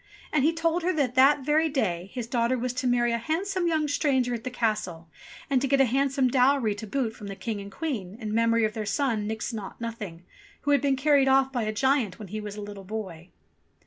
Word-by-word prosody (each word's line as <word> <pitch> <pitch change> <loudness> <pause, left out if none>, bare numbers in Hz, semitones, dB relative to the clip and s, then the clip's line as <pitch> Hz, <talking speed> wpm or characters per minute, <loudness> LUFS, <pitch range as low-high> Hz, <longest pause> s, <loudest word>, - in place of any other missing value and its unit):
And 300 -3 +3
he 315 - +4
told 330 +1 0
her 360 +2 +1
that 275 -6 0
that 275 +3 +5
very 310 +2 +3
day 190 - -1
his 245 -3 -4
daughter 235 +1 0
was 250 0 -2
to 255 +1 -2
marry 240 -1 +2
a 235 - 0
handsome 355 - -1
young 315 -2 +1
stranger 265 -4 +1
at 230 -1 -4
the 255 - -3
castle, 210 -9 -2 0.4
and 265 -2 +2
to 275 - +1
get 275 +1 +2
a 270 - +6
handsome 270 +2 +1
dowry 250 -3 +3
to 210 +2 -8
boot 230 -1 -2
from 205 - -9
the 195 - -6
King 205 +2 -4
and 200 0 -9
Queen, 220 - -4
in 215 -2 -4
memory 230 0 +3
of 215 - -2
their 220 - -3
son, 215 0 0
Nix 220 +2 -3
Naught 210 -4 -7
Nothing, 210 -7 -6 0.4
who 290 - 0
had 285 - +4
been 280 -1 +2
carried 275 0 +3
off 265 0 +4
by 245 -3 -1
a 215 - -1
giant 260 -2 +1
when 210 -4 -9
he 215 +2 -4
was 210 -1 -6
a 210 - -6
little 205 -1 -8
boy. 185 -4 -6
240 Hz, 240 wpm, -27 LUFS, 215-275 Hz, 0.4 s, a